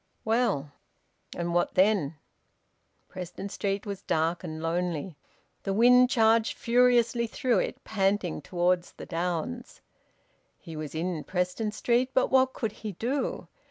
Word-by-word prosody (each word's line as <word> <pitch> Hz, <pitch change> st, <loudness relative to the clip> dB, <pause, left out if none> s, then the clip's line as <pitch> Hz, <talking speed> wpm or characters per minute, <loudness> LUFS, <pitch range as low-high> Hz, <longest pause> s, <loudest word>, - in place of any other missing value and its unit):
Well, 220 Hz, -, +1 dB, 0.7 s
and 170 Hz, 0 st, -2 dB
what 175 Hz, 0 st, +1 dB
then? 185 Hz, -6 st, +3 dB, 0.9 s
Preston 185 Hz, +2 st, -7 dB
Street 200 Hz, 0 st, -2 dB
was 200 Hz, -2 st, -5 dB
dark 165 Hz, +1 st, 0 dB
and 160 Hz, -2 st, -6 dB
lonely. 170 Hz, 0 st, -2 dB, 0.5 s
The 195 Hz, -, -2 dB
wind 250 Hz, +3 st, +6 dB
charged 225 Hz, -2 st, +3 dB
furiously 240 Hz, -1 st, +3 dB
through 235 Hz, -1 st, +1 dB
it, -, -, -3 dB
panting 195 Hz, -5 st, 0 dB
towards 175 Hz, +1 st, 0 dB
the -, -, -9 dB
downs. 180 Hz, +8 st, -3 dB, 0.8 s
He 165 Hz, -3 st, -10 dB
was 155 Hz, -1 st, -6 dB
in 165 Hz, -1 st, -2 dB
Preston 180 Hz, +4 st, -1 dB
Street, 240 Hz, +4 st, +1 dB
but 260 Hz, -, +2 dB
what 260 Hz, 0 st, +4 dB
could 225 Hz, -3 st, -2 dB
he 210 Hz, -1 st, -7 dB
do? 250 Hz, +8 st, -2 dB
195 Hz, 130 wpm, -28 LUFS, 175-235 Hz, 0.9 s, wind